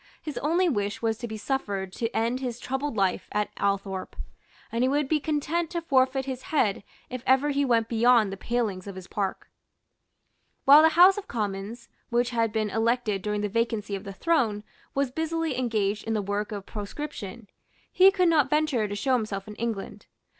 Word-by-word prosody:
His 300 Hz, -, -5 dB
only 340 Hz, +5 st, +2 dB
wish 205 Hz, -7 st, -1 dB
was 225 Hz, -1 st, 0 dB
to 240 Hz, -, -4 dB
be 220 Hz, -1 st, -6 dB
suffered 205 Hz, -6 st, -3 dB
to 230 Hz, +2 st, -2 dB
end 235 Hz, +3 st, 0 dB
his 245 Hz, -3 st, -4 dB
troubled 265 Hz, -1 st, -3 dB
life 195 Hz, -2 st, +1 dB
at 210 Hz, 0 st, -1 dB
Althorpe; 195 Hz, -1 st, -2 dB, 0.6 s
and 230 Hz, +2 st, 0 dB
he -, -, +3 dB
would 285 Hz, +1 st, +1 dB
be 310 Hz, +2 st, +2 dB
content 310 Hz, +3 st, -1 dB
to 340 Hz, -1 st, -3 dB
forfeit 265 Hz, -3 st, +2 dB
his 260 Hz, -2 st, -4 dB
head 220 Hz, -12 st, 0 dB, 0.3 s
if 255 Hz, -1 st, -4 dB
ever 265 Hz, +3 st, +4 dB
he 285 Hz, 0 st, +1 dB
went 230 Hz, -4 st, +2 dB
beyond 230 Hz, -2 st, +4 dB
the -, -, -4 dB
palings 205 Hz, -3 st, -2 dB
of 200 Hz, -, -7 dB
his 185 Hz, -1 st, -8 dB
park. 195 Hz, 0 st, -4 dB, 1.1 s
While 285 Hz, +3 st, +9 dB
the 320 Hz, +1 st, +3 dB
House 375 Hz, +3 st, +7 dB
of 405 Hz, -, -11 dB
Commons, 210 Hz, +1 st, -4 dB, 0.2 s
which 240 Hz, +1 st, +1 dB
had 230 Hz, -2 st, +1 dB
been 215 Hz, -1 st, -1 dB
elected 225 Hz, -3 st, 0 dB
during 210 Hz, 0 st, -2 dB
the 210 Hz, -, 0 dB
vacancy 215 Hz, -1 st, -1 dB
of 195 Hz, -, -6 dB
the 200 Hz, -, -7 dB
throne, 220 Hz, -, 0 dB, 0.3 s
was 275 Hz, -2 st, 0 dB
busily 320 Hz, 0 st, -1 dB
engaged 215 Hz, -4 st, -1 dB
in 225 Hz, 0 st, -1 dB
the 210 Hz, -, +1 dB
work 205 Hz, +2 st, -2 dB
of 200 Hz, -2 st, -5 dB
proscription, 220 Hz, -1 st, -7 dB, 0.4 s
he 375 Hz, +1 st, +7 dB
could 375 Hz, -2 st, +2 dB
not 300 Hz, -5 st, +3 dB
venture 300 Hz, -7 st, +1 dB
to 205 Hz, -, -4 dB
show 260 Hz, +6 st, 0 dB
himself 215 Hz, -5 st, -1 dB
in 210 Hz, -, -7 dB
England. 225 Hz, -4 st, -4 dB
235 Hz, 190 wpm, -26 LUFS, 205-275 Hz, 1.1 s, While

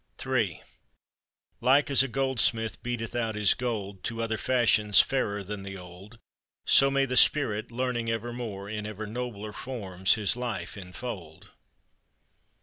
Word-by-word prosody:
Ill 115 Hz, -10 st, 0 dB, 1.0 s
Like 140 Hz, +4 st, +4 dB
as 135 Hz, -, +6 dB
a 135 Hz, -, +1 dB
goldsmith 120 Hz, -4 st, 0 dB
beateth 120 Hz, -2 st, -4 dB
out 115 Hz, -2 st, -1 dB
his 105 Hz, -2 st, +4 dB
gold 105 Hz, -6 st, -4 dB
To 115 Hz, 0 st, -3 dB
other 110 Hz, -1 st, -2 dB
fashions 110 Hz, -5 st, +3 dB
fairer 105 Hz, -7 st, +1 dB
than 100 Hz, +1 st, -6 dB
the 100 Hz, 0 st, -7 dB
old, 90 Hz, +5 st, -13 dB, 0.5 s
So 135 Hz, -, +6 dB
may 135 Hz, 0 st, +2 dB
the 125 Hz, -1 st, -3 dB
Spirit, 115 Hz, -5 st, +3 dB
learning 120 Hz, -1 st, -2 dB
ever 115 Hz, +1 st, -3 dB
more, 105 Hz, -5 st, -6 dB
In 105 Hz, 0 st, -5 dB
ever 110 Hz, 0 st, -6 dB
nobler 110 Hz, -2 st, -5 dB
forms 95 Hz, -7 st, 0 dB
his 105 Hz, -3 st, +1 dB
life 125 Hz, -2 st, -4 dB
infold. 90 Hz, -4 st, -8 dB
115 Hz, 145 wpm, -28 LUFS, 100-125 Hz, 1.0 s, as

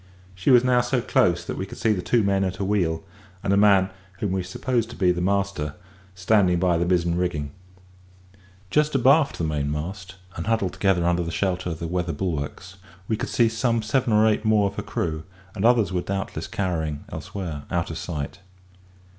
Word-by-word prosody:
She 95 Hz, +5 st, -2 dB
was 125 Hz, -2 st, +7 dB
now 125 Hz, -1 st, +4 dB
so 125 Hz, +1 st, 0 dB
close 85 Hz, -6 st, +2 dB
that -, -, -5 dB
we 95 Hz, -, -3 dB
could -, -, -10 dB
see 110 Hz, -, +2 dB
the 95 Hz, -, -2 dB
two 115 Hz, +5 st, +2 dB
men 100 Hz, -1 st, +2 dB
at 95 Hz, -1 st, -1 dB
her 100 Hz, -, -4 dB
wheel, 90 Hz, -5 st, 0 dB, 0.4 s
and 100 Hz, -, +1 dB
a -, -, +4 dB
man, 100 Hz, -2 st, +4 dB, 0.2 s
whom 95 Hz, +1 st, -3 dB
we 95 Hz, 0 st, 0 dB
supposed 115 Hz, +5 st, -2 dB
to 120 Hz, -, -9 dB
be 90 Hz, -2 st, +3 dB
the 90 Hz, 0 st, -2 dB
master, 100 Hz, -6 st, -1 dB, 0.4 s
standing 90 Hz, -1 st, +3 dB
by 85 Hz, -2 st, +2 dB
the 85 Hz, -, 0 dB
mizen 85 Hz, -1 st, +1 dB
rigging. 75 Hz, -6 st, -2 dB, 1.2 s
Just 150 Hz, -1 st, +2 dB
abaft 135 Hz, +3 st, +4 dB
the -, -, -3 dB
mainmast, 80 Hz, +6 st, -3 dB, 0.2 s
and 85 Hz, -, -5 dB
huddled 110 Hz, -5 st, +1 dB
together 95 Hz, -4 st, +1 dB
under 85 Hz, 0 st, +2 dB
the 85 Hz, -, -3 dB
shelter 90 Hz, +1 st, -1 dB
of 80 Hz, -, -4 dB
the 85 Hz, -, -5 dB
weather 85 Hz, 0 st, -2 dB
bulwarks, 90 Hz, +1 st, -4 dB, 0.3 s
we 110 Hz, -, +1 dB
could -, -, -4 dB
see 120 Hz, -, +3 dB
some 115 Hz, 0 st, 0 dB
seven 115 Hz, +2 st, +1 dB
or 105 Hz, +1 st, +5 dB
eight 110 Hz, 0 st, +1 dB
more 110 Hz, -2 st, +3 dB
of 100 Hz, 0 st, -2 dB
her -, -, -1 dB
crew, 80 Hz, -2 st, -3 dB, 0.3 s
and 105 Hz, 0 st, -2 dB
others 115 Hz, -5 st, +4 dB
were 90 Hz, -, 0 dB
doubtless 95 Hz, +1 st, -4 dB
cowering 80 Hz, -6 st, -2 dB
elsewhere 80 Hz, -8 st, -6 dB
out 85 Hz, -2 st, -1 dB
of 80 Hz, -, -5 dB
sight. 75 Hz, 0 st, -5 dB
95 Hz, 200 wpm, -24 LUFS, 85-110 Hz, 1.2 s, was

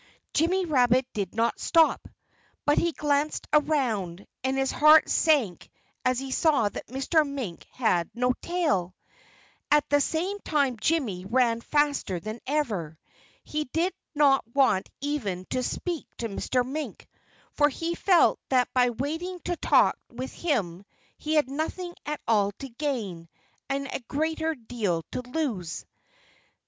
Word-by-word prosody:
Jimmy 360 Hz, +5 st, +2 dB
Rabbit 255 Hz, -4 st, +3 dB
did 200 Hz, -1 st, -3 dB
not 230 Hz, +1 st, +1 dB
stop. 325 Hz, -1 st, +3 dB, 0.6 s
But 290 Hz, -, +4 dB
he 340 Hz, -, +1 dB
glanced 295 Hz, 0 st, 0 dB
around. 230 Hz, -, +1 dB, 0.2 s
And 265 Hz, +1 st, 0 dB
his 270 Hz, 0 st, +1 dB
heart 305 Hz, +1 st, +6 dB
sank 270 Hz, -, +2 dB, 0.3 s
as 255 Hz, 0 st, +2 dB
he 265 Hz, +1 st, -4 dB
saw 280 Hz, -7 st, +3 dB
that -, -, -8 dB
Mr. 275 Hz, +6 st, +2 dB
Mink 270 Hz, -, -5 dB
had 180 Hz, -9 st, +1 dB
no 250 Hz, +1 st, +2 dB
tail! 205 Hz, -, 0 dB, 0.7 s
At 295 Hz, -1 st, +4 dB
the 290 Hz, 0 st, +5 dB
same 360 Hz, +8 st, -1 dB
time 280 Hz, -, 0 dB
Jimmy 245 Hz, -, 0 dB
ran 235 Hz, +1 st, +2 dB
faster 290 Hz, -, 0 dB
than 215 Hz, +5 st, -6 dB
ever. 210 Hz, -, -1 dB, 0.5 s
He 305 Hz, 0 st, -3 dB
did 330 Hz, +8 st, -1 dB, 0.2 s
not 280 Hz, -2 st, +4 dB
want 260 Hz, -9 st, +3 dB
even 220 Hz, -11 st, -2 dB
to 255 Hz, -, 0 dB
speak 340 Hz, +5 st, -3 dB
to 230 Hz, -, -3 dB
Mr. 245 Hz, +5 st, 0 dB
Mink, 295 Hz, +4 st, -5 dB, 0.5 s
for 295 Hz, -1 st, +4 dB
he 330 Hz, +4 st, -3 dB
felt 355 Hz, 0 st, +4 dB
that 250 Hz, -2 st, +2 dB
by 250 Hz, -1 st, +4 dB
waiting 320 Hz, +9 st, -4 dB
to 350 Hz, -, -2 dB
talk -, -, +3 dB
with 255 Hz, +2 st, -6 dB
him 200 Hz, -, -1 dB, 0.4 s
he 310 Hz, +1 st, -1 dB
had 300 Hz, -3 st, +3 dB
nothing 320 Hz, +6 st, -4 dB
at 300 Hz, 0 st, -2 dB
all 205 Hz, -3 st, +3 dB
to 270 Hz, +6 st, -9 dB
gain, 230 Hz, -, -4 dB, 0.4 s
and 275 Hz, 0 st, -1 dB
a -, -, -3 dB
great 315 Hz, 0 st, -2 dB
deal 195 Hz, -9 st, -1 dB
to -, -, -3 dB
lose. 250 Hz, -, -3 dB
270 Hz, 145 wpm, -27 LUFS, 225-305 Hz, 0.7 s, heart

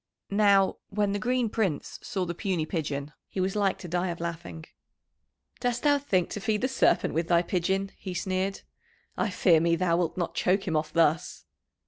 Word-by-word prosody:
Now, 200 Hz, -1 st, +4 dB
when 205 Hz, 0 st, 0 dB
the 205 Hz, -, -1 dB
Green 245 Hz, +2 st, +1 dB
Prince 200 Hz, -9 st, -2 dB
saw 190 Hz, -2 st, -2 dB
the 170 Hz, -, -3 dB
puny 175 Hz, -3 st, -1 dB
pigeon, 150 Hz, -3 st, -3 dB, 0.2 s
he -, -, -5 dB
was 190 Hz, +2 st, 0 dB
like 200 Hz, -2 st, +1 dB
to 180 Hz, -, -9 dB
die 175 Hz, +2 st, -1 dB
of 170 Hz, -1 st, -4 dB
laughing. 170 Hz, -1 st, -6 dB, 0.9 s
"Dost 245 Hz, -1 st, -1 dB
thou 290 Hz, -1 st, +4 dB
think 190 Hz, -11 st, 0 dB
to -, -, -4 dB
feed 210 Hz, 0 st, 0 dB
the 255 Hz, -, +2 dB
Serpent 265 Hz, -, +2 dB
with 165 Hz, +2 st, 0 dB
thy 170 Hz, 0 st, +4 dB
pigeon?" 190 Hz, +2 st, -1 dB
he 185 Hz, -2 st, -6 dB
sneered. 190 Hz, +2 st, -1 dB, 0.5 s
"I -, -, 0 dB
fear 180 Hz, -3 st, +4 dB
me 170 Hz, +1 st, +2 dB
thou 170 Hz, -1 st, +1 dB
wilt 175 Hz, -1 st, -1 dB
not 175 Hz, -2 st, -2 dB
choke 190 Hz, +2 st, +1 dB
him 165 Hz, -, 0 dB
off 155 Hz, 0 st, 0 dB
thus." 160 Hz, -1 st, +1 dB
185 Hz, 190 wpm, -28 LUFS, 170-200 Hz, 0.9 s, Now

